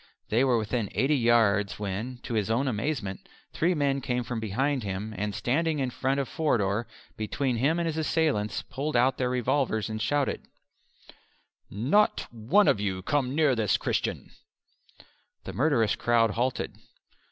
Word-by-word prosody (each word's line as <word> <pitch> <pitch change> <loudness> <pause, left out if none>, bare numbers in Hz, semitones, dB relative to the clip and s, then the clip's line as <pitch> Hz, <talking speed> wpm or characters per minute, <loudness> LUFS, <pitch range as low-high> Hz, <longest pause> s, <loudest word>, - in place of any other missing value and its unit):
They 115 +4 +3
were 130 -3 +3
within 110 0 -2
eighty 140 +3 +2
yards 115 -5 +3
when, 105 +5 -4
to - - -5
his 110 -2 0
own 125 +5 +1
amazement, 110 -4 -3 0.2
three 175 +3 +1
men 140 -2 +1
came 125 -2 -1
from 120 -1 -4
behind 130 +6 -1
him, 100 +1 -4
and 105 +1 -3
standing 155 +8 0
in 130 -3 -1
front 135 +3 -1
of 135 - -1
Forder 115 -8 0 0.3
between 120 +4 -1
him 145 +8 +2
and 170 - 0
his 160 -1 -2
assailants 155 -9 0
pulled 145 +2 -4
out 125 +2 +3
their 125 -1 +1
revolvers 125 -3 0
and 110 0 -4
shouted, 140 +5 0 1.3
"Not 140 - +2
one 120 - +3
of - - +3
you 95 -2 -2
come 135 +1 0
near 150 -4 +3
this 110 -3 +2
Christian!" - - -2 1.1
The - - -7
murderous 125 -6 +2
crowd 115 -2 +2
halted. 120 +3 -2
125 Hz, 155 wpm, -27 LUFS, 110-140 Hz, 1.3 s, They